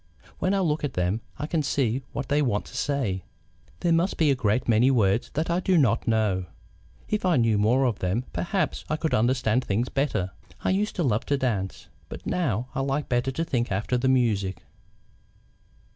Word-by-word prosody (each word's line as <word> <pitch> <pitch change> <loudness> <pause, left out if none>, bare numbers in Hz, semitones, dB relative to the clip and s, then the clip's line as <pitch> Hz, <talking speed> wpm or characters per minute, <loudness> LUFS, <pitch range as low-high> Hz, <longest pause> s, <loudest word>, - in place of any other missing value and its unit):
When 190 +2 +1
I 195 - +1
look 155 -4 0
at 140 -3 -2
them 90 +5 0 0.2
I 150 - -3
can 160 +1 0
see 135 -4 0
what 140 - -4
they 145 +1 +2
want 115 -7 0
to - - -12
say. 120 - -1 0.6
There 175 - +2
must 170 +4 +2
be 155 -3 +4
a - - +3
great 120 0 0
many 120 +3 +4
words 115 -4 +2
that 160 +3 0
I 170 - +2
do 185 -1 +2
not 120 -6 +2
know; 105 -5 +1 0.6
if 215 - -1
I 180 -3 +3
knew 115 -3 +3
more 120 +6 +3
of 120 -5 0
them 95 +7 0
perhaps 190 +2 -1
I 155 - +1
could 155 -3 -1
understand 125 0 +2
things 115 +5 -1
better. 135 -10 -1 0.3
I - - +2
used 205 +3 0
to 180 - 0
love 115 -5 0
to 140 - +2
dance, 105 -8 -2 0.2
but - - -9
now 125 - -1
I - - -2
like 135 +2 -1
better 125 +1 +1
to 145 +5 -2
think 125 -8 -1
after 100 +6 0
the 130 +2 +1
music." 105 -7 +1
125 Hz, 200 wpm, -26 LUFS, 110-150 Hz, 0.6 s, be